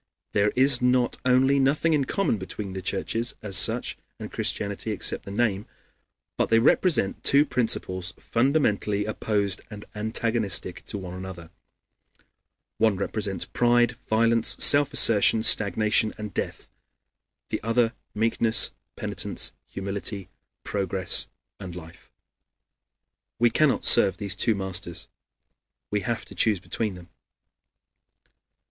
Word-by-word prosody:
There 105 +1 +1
is 130 0 +4
not 125 0 +1
only 130 +2 +3
nothing 150 +4 +1
in 145 -3 +1
common 195 - -1
between 95 +1 -7
the 95 - -5
churches 115 +5 -2
as 100 -3 -3
such - - +3 0.2
and - - -9
Christianity, 100 +1 -2
except 105 - 0
the - - -8
name, 105 -1 -1 0.7
but - - 0
they 115 - +4
represent 120 - +1
two 140 +2 +5
principles 95 - 0
fundamentally 110 -6 0
opposed 105 -2 -2
and 105 -2 -10
antagonistic 110 -3 -1
to - - -5
one 90 -2 -8
another. 90 -2 -9 1.3
One 110 -3 +3
represents 100 0 -3
pride, 120 0 +2
violence, 115 +1 +2
self 145 0 +5
assertion, 110 0 +5
stagnation, 110 +2 +2
and 105 -1 -7
death; - - -5 0.8
the - - -3
other, 115 +1 +1 0.2
meekness, 110 -1 +3 0.2
penitence, - - -3 0.2
humility, 100 0 -4 0.3
progress, 95 -2 0 0.3
and 90 -3 -8
life. 80 -2 -13 1.3
We 120 0 +3
cannot 150 +3 +1
serve 100 - +6
these 100 -3 -2
two 110 +3 +1
masters; 95 -3 -4 0.8
we 105 - 0
have 115 +4 -4
to - - -13
choose 105 -4 +1
between 105 +2 -4
them. 90 -1 -14
105 Hz, 120 wpm, -25 LUFS, 100-120 Hz, 1.3 s, serve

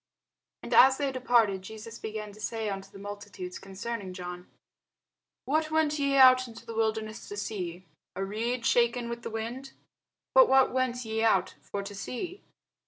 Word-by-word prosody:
And - - -4
as 265 +1 +8
they 280 -2 0
departed, 235 -6 +2
Jesus 220 +3 -9
began 215 -1 -5
to 210 +1 -14
say 225 -1 -2
unto 195 0 -6
the 200 - -13
multitudes 200 -2 -7
concerning 195 0 -6
John, 180 -1 -7 1.0
What 310 +2 +1
went 310 -1 +1
ye 280 -1 +1
out 255 -1 +7
into 230 -1 -12
the 230 - -7
wilderness 220 -1 -2
to 205 - -6
see? 185 -4 -4 0.3
A 195 - -2
reed 230 +4 -2
shaken 235 0 +2
with 235 0 -5
the - - -5
wind? 235 +5 -5 0.6
But - - +7
what 265 -1 +5
went 255 -1 0
ye 220 0 -2
out 190 -5 +3
for 200 0 -5
to 200 - -7
see? 335 - -5
225 Hz, 170 wpm, -29 LUFS, 200-255 Hz, 1.0 s, as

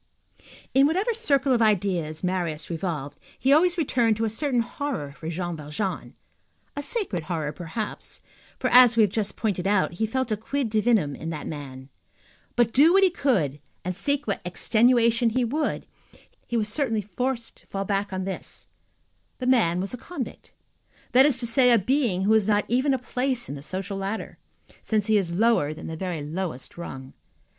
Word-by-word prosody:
In 275 +1 +6
whatever 385 +9 +1
circle 280 - +2
of 235 - +2
ideas 180 -7 +1
Marius 175 -4 -2
revolved, 160 -5 -4 0.2
he 270 +2 +3
always 350 +4 +4
returned 240 -8 +2
to 225 - 0
a 220 - -1
certain 250 +1 +1
horror 240 - -4
for 160 +3 -7
Jean 175 0 -3
Valjean. 155 +6 -4 0.6
A 285 - -3
sacred 290 - -2
horror, 155 -4 -2
perhaps, 180 +7 -5 0.4
for, - - -1
as 245 -2 +8
we - - +7
have 205 - +2
just 210 -1 -1
pointed 195 -4 -1
out, 205 -1 +2
he 220 +6 -1
felt 260 +1 -1
a 215 - +1
quid 240 +2 -2
divinum 215 - +2
in 160 - -6
that 160 -2 -5
man. 135 -4 -7 0.7
But 240 -2 +2
do 305 +6 +6
what 390 +1 +5
he 370 -2 +3
would, 160 - +2 0.3
and 185 0 -2
seek 285 +9 0
what 200 - -2
extenuation 235 +5 +3
he 245 +2 +1
would, 295 +6 -1 0.6
he 240 - -1
was 215 -2 0
certainly 225 -2 0
forced 235 +4 -3
to - - -25
fall 195 0 -3
back 200 0 0
upon 190 -1 -4
this: 190 0 -6 0.7
the 255 - -5
man 220 -10 +3
was 195 +4 -3
a - - -4
convict; 270 -1 -7 0.6
that 260 +3 +7
is 275 -4 +1
to - - -2
say, 250 +2 +4
a 235 - +7
being 225 -3 +1
who 210 +3 +3
has 215 -2 +3
not 210 -1 +2
even 260 +4 +2
a - - -1
place 250 0 -2
in - - -5
the 140 - -7
social 195 +5 -4
ladder, 195 +3 -4 0.4
since 215 -2 0
he 215 -1 +3
is 175 -3 -1
lower 215 -9 +2
than - - -9
the 160 - -5
very 170 -3 -4
lowest 155 -3 -4
rung. 135 -6 -8
215 Hz, 185 wpm, -25 LUFS, 180-255 Hz, 0.7 s, as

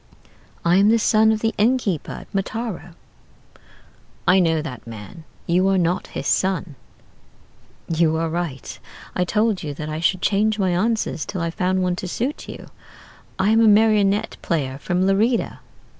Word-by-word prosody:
I 175 +2 +4
am 200 +2 +5
the 230 - +5
son 220 0 +4
of 215 -1 -1
the 225 0 0
innkeeper 215 - +1
at - - -10
Mataro.' 195 -3 -4 1.3
"'I 185 +1 +6
know 165 -3 +2
that 125 -6 -8
man: 115 +8 -10 0.2
you 180 +3 +2
are 195 - +2
not 180 +1 0
his - - -4
son.' 185 -4 0 1.1
"'You 160 -1 +2
are 165 +1 0
right: 160 -5 -4 0.4
I 180 - +1
told 210 +2 +1
you 145 -2 -5
that 155 +1 -6
I 155 +1 -3
should 185 +2 0
change 210 +1 +2
my 190 -3 +1
answers 210 -2 0
till 185 - -5
I 170 0 -1
found 185 +2 0
one 180 -1 0
to 185 - -5
suit 255 - -3
you. - - -9 0.7
I 195 +3 +2
am 225 +1 +4
a 225 - +5
marionette 210 -1 +3
player 140 -5 -2
from 180 +4 0
Lerida.' 215 +5 +1
185 Hz, 165 wpm, -22 LUFS, 165-215 Hz, 1.3 s, I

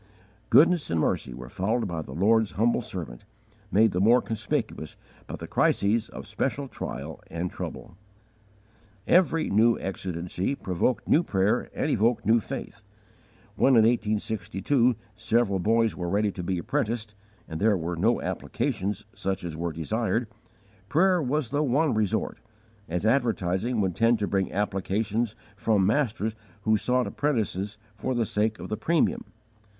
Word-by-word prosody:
Goodness 170 +1 +5
and 85 - +1
mercy 65 - 0
were - - -8
following 110 +5 -1
the 80 -7 -5
Lord's 110 +4 +3
humble 115 +4 +2
servant, 80 - -7 0.5
made 110 +1 +5
the 90 - 0
more 115 +5 +6
conspicuous 110 -2 -3 0.3
by - - -5
the - - -7
crises 110 +3 +2
of - - -8
special 140 +1 -2
trial 75 - -6
and 85 +2 -4
trouble. - - -7 1.1
Every 165 -3 +3
new 115 +3 +4
exigency 90 +4 -3
provoked 100 +3 -1
new 160 - +5
prayer 100 - 0
and - - 0
evoked 115 +3 +2
new 115 +2 +5
faith. - - -7 0.7
When, 135 - +4
in 115 - +7
1862, 110 +2 +1 0.2
several 110 -2 +1
boys 115 +3 +2
were 90 -1 -3
ready 105 +2 +1
to 95 - -6
be 90 +1 -1
apprenticed, 115 - -2 0.3
and 80 0 -6
there 105 -1 +4
were 85 +1 -3
no 85 - +2
applications 100 +2 -2
such 95 -3 -3
as 85 -3 -5
were 85 +1 -2
desired, 110 +9 -1 0.6
prayer 180 +2 +3
was 140 -2 -1
the 145 +2 0
one 145 +2 +2
resort, 110 0 -1 0.5
as 90 +5 -2
advertising 110 -2 +1
would 95 -3 0
tend 115 +4 +3
to 105 -1 -1
bring 95 -1 0
applications 105 +3 -1 0.2
from 105 -1 +2
masters 110 -4 0 0.3
who 110 -1 +3
sought 125 +4 +1
apprentices 105 -7 -1 0.2
for 125 - -2
the 120 -1 +1
sake 110 +1 0
of - - -7
the 105 - -3
premium. 165 -2 +1
110 Hz, 145 wpm, -27 LUFS, 95-120 Hz, 1.1 s, in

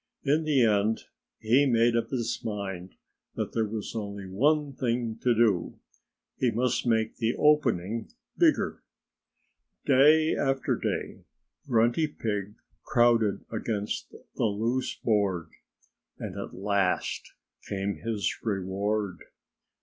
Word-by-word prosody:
In 150 +3 +2
the 140 -6 +4
end 105 +1 +2 0.4
he 125 +6 +3
made 120 -1 +3
up 115 -1 0
his 120 -3 -2
mind 95 -4 -5 0.4
that - - -3
there 110 -1 +1
was 105 0 -5
only 100 -2 -5
one 140 +9 +1
thing 120 -3 -2
to 120 -2 +3
do: 105 -6 +2 0.6
he 125 - +3
must 120 +2 0
make 110 -1 +1
the 115 0 0
opening 115 -8 +2 0.3
bigger. - - +2 1.0
Day 155 +4 +5
after 135 -1 0
day - - -3 0.5
Grunty 120 +5 +3
Pig 105 -7 -4 0.3
crowded 115 -3 +2
against 110 -2 -3 0.3
the - - +1
loose 115 +5 -1
board. 100 -7 0 0.7
And - - -6
at - - -6
last 100 -1 -1 0.4
came 100 0 -2
his 110 -3 -2
reward. 100 -1 -2
115 Hz, 115 wpm, -28 LUFS, 100-125 Hz, 1.0 s, Day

